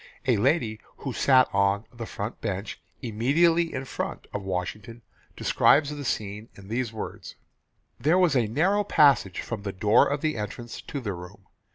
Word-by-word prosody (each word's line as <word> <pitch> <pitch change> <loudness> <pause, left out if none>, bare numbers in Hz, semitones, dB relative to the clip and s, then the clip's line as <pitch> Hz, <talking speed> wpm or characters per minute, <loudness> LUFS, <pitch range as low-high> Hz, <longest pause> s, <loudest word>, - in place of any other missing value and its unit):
A 125 -4 +3
lady 115 -2 +1 0.2
who 135 - -5
sat 130 +2 +5
on 100 +2 +2
"the 115 -2 -7
front 105 +4 -6
bench," 100 -1 -4 0.2
"immediately 165 +9 +2
in 130 0 -4
front" - - -5
of 100 - -3
Washington 95 +5 -5 0.3
describes 145 0 +3
the 145 -1 -6
scene 105 -3 -3
in 100 0 -13
these 120 0 -1
words: 105 -3 -7 0.6
"There 160 +5 +3
was 180 -6 +3
a 120 -4 +3
narrow 185 - +2
passage 140 - +3
from 115 -4 -5
the 100 -1 -4
door 105 +3 +4
of 145 +2 -2
entrance 120 -4 -4
to 140 - -6
the 105 -5 -3
room. 90 +3 -11
115 Hz, 165 wpm, -26 LUFS, 100-140 Hz, 0.6 s, sat